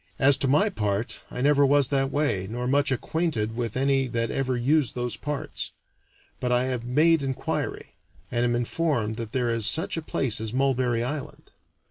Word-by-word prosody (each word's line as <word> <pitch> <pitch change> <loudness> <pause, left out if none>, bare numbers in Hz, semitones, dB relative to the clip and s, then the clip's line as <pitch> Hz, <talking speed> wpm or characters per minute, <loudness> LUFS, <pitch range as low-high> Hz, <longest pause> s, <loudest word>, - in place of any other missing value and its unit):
As 140 +1 +5
to 135 - 0
my 150 +11 +4
part, 105 - -2
I 125 - -5
never 145 +1 +4
was 140 -1 +3
that 135 -1 +1
way, 135 -11 0
nor 120 +2 -3
much 140 +2 +2
acquainted 130 -6 -1
with 120 -1 -3
any 135 0 +2
that 115 -1 -1
ever 130 -2 -1
used 140 +1 +2
those 120 -3 -2
parts; 145 +4 -4 0.7
but 125 - -1
I 125 0 +3
have 130 -2 -2
made 155 +6 +3
inquiry, 135 -1 -3 0.4
and 120 -1 +1
am 120 0 +2
informed 120 -3 -1
that 115 -2 -5
there 125 -2 0
is 115 -2 +1
such 160 +7 +1
a - - -1
place 125 -7 -1
as 110 0 -4
Mulberry 130 -3 +1
Island. 145 +3 -6
130 Hz, 180 wpm, -26 LUFS, 120-140 Hz, 0.7 s, As